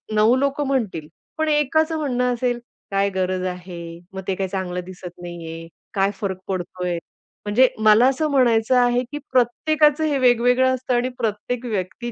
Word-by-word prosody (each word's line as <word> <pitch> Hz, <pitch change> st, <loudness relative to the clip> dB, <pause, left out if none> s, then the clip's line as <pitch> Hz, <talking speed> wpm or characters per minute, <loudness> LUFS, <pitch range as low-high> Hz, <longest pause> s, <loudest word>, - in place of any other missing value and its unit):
9 215 Hz, +3 st, +5 dB
लोकं 280 Hz, +1 st, 0 dB
म्हणतील. 210 Hz, -, -1 dB, 0.3 s
पण 315 Hz, -, 0 dB
एकाचं 315 Hz, +2 st, +2 dB
म्हणणं 250 Hz, -4 st, 0 dB
असेल 245 Hz, 0 st, -1 dB, 0.3 s
"काय 195 Hz, 0 st, +2 dB
गरज 185 Hz, -1 st, -1 dB
आहे, 180 Hz, -1 st, -7 dB, 0.3 s
मग 190 Hz, -, -5 dB
ते 190 Hz, -, 0 dB
काय 190 Hz, 0 st, -2 dB
चांगलं 185 Hz, -1 st, -3 dB
दिसत 180 Hz, -1 st, -10 dB
नाहीये, 165 Hz, -1 st, -7 dB, 0.3 s
काय 195 Hz, -1 st, +2 dB
फरक 190 Hz, -3 st, -2 dB
पडतोय". 180 Hz, -1 st, -3 dB, 0.5 s
म्हणजे 245 Hz, +5 st, +5 dB, 0.2 s
मला 215 Hz, +4 st, +6 dB
असं 300 Hz, +3 st, -1 dB
म्हणायचं 245 Hz, -2 st, +3 dB
आहे, 245 Hz, +1 st, +2 dB
की 295 Hz, -, -4 dB
प्रत्येकाचं 295 Hz, +5 st, +3 dB
हे 295 Hz, -3 st, +1 dB
वेगवेगळं 250 Hz, +1 st, +4 dB
असतं 255 Hz, 0 st, -3 dB
आणि 245 Hz, +1 st, +1 dB
प्रत्येक 230 Hz, +3 st, -3 dB
व्यक्ती 220 Hz, +2 st, -3 dB
235 Hz, 160 wpm, -22 LUFS, 185-260 Hz, 0.5 s, मला